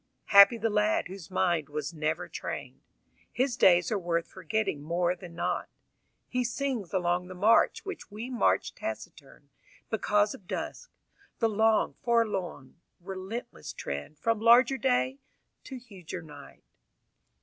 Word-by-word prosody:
Happy 200 +4 +9
the 225 0 0
lad 210 +1 +2
whose 190 -2 -9
mind 175 -5 0
was 150 +1 -4
never 155 +1 -2
trained: - - -6 0.5
His 255 -1 0
days 175 -2 +5
are 210 - +1
worth 170 -2 -1
forgetting 220 -9 -2
more 175 +3 0
than 175 -1 -11
not. 170 - -2 0.6
He 250 0 -1
sings 245 -5 -2
along 180 -1 0
the 185 - -9
march 210 - +3
Which 390 - -7
we 220 +3 -6
march 250 -2 +1
taciturn, - - -8 0.4
because 210 -1 +2
of 185 - -13
dusk, - - -5 0.5
The 230 - +2
long, 220 +1 +2
forlorn, 205 - -1 0.2
relentless 190 - -7
trend 70 - -6
From 230 +3 0
larger 245 +4 +6
day 260 +1 +1 0.5
to 265 - -7
huger 190 -8 -9
night. 145 -3 -13
200 Hz, 135 wpm, -29 LUFS, 175-230 Hz, 0.6 s, Happy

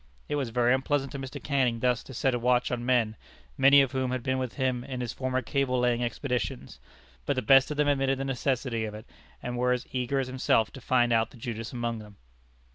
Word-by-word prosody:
It - - -3
was 135 -5 -1
very 120 +1 +2
unpleasant 135 +1 0
to 140 - -6
Mr. 135 0 -6
Canning 130 -5 +1
thus 125 0 +1
to 130 - -10
set 130 +2 +1
a 120 - 0
watch 125 +1 +2
on 120 -1 -2
men, 120 -3 +2 0.4
many 140 - +7
of 135 - -3
whom 130 -2 -1
had 125 -1 -3
been 130 +1 0
with 130 -2 -4
him 130 -3 -1
in 130 -1 -6
his 120 -1 -3
former 130 0 -2
cable 135 0 0
laying 120 -1 +1
expeditions, 120 - -3 0.5
but - - +1
the 130 - -1
best 135 +4 +6
of 150 - -4
them 150 0 +2
admitted 135 -1 +2
the 135 - -3
necessity 130 -3 -1
of 105 -1 -6
it, 110 - -10 0.4
and 120 0 -3
were 125 0 +3
as 125 - -3
eager 130 +1 -1
as 135 - 0
himself 130 -3 +1
to 135 - -11
find 120 -1 +2
out 115 0 +2
the - - -16
Judas 115 -1 -5
among 120 -2 -3
them. 105 -2 -13
125 Hz, 235 wpm, -28 LUFS, 120-135 Hz, 0.5 s, many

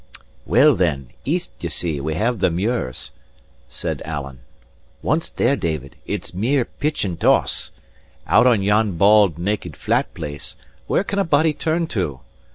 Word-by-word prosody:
"Well, - - +6
then, 70 -4 0 0.2
east, 175 +5 -1
ye 85 - -3
see, 80 -3 -2
we 80 +2 -2
have 115 +5 0
the - - +3
muirs," 90 - -2 0.6
said - - -4
Alan. 70 -4 -5 0.6
"Once 160 +2 0
there, 140 - +1
David, 80 - -3
it's - - -4
mere 120 +7 +1
pitch 150 -5 -2
and 85 -4 -4
toss. - - +2 0.5
Out 125 - +5
on 115 -6 +3
yon 105 -2 +2
bald, 100 -3 +5
naked, 90 -3 -3
flat - - 0
place, 75 -3 -6 0.3
where - - +2
can 200 0 -2
a - - +3
body 155 -2 +3
turn 165 +3 0
to? 75 - -2
100 Hz, 155 wpm, -21 LUFS, 80-125 Hz, 0.6 s, Well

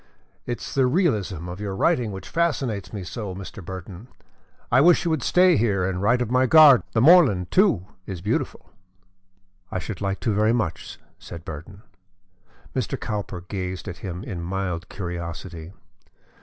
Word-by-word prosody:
It 120 -2 -3
is - - -7
the 135 -2 +3
realism 105 - 0
of 90 +2 -7
your 100 -2 -3
writing 125 - +1
which 95 -1 -8
fascinates 135 - -1
me 100 -3 -5
so, 100 0 -6
Mr. 95 +1 -9
Burton. 95 +4 -8 0.6
I 125 +2 +5
wish 175 +3 +5
you 170 - +1
would 160 -4 0
stay 180 +1 +4
here 100 -5 +1
and 95 -1 -3
write 120 +4 +3
of 120 - -6
my 130 0 +3
garden; 150 -4 +8
the 110 - +2
moorland, 135 - +5
too, 180 - +3 0.2
is 95 -3 -5
beautiful." 105 +5 -3 1.0
"I - - -2
should 95 +1 -6
like 100 -1 -2
to 110 - 0
very 110 +2 +3
much," 100 -9 -3 0.2
said 85 0 -10
Burton. 95 +5 -9 0.9
Mr. - - -2
Cowper 100 -4 -4
gazed 90 -2 -5
at 90 - -6
him 90 -1 -6
in 90 -6 -6
mild 90 -1 -3
curiosity. 85 -2 -6
100 Hz, 165 wpm, -24 LUFS, 90-125 Hz, 1.0 s, garden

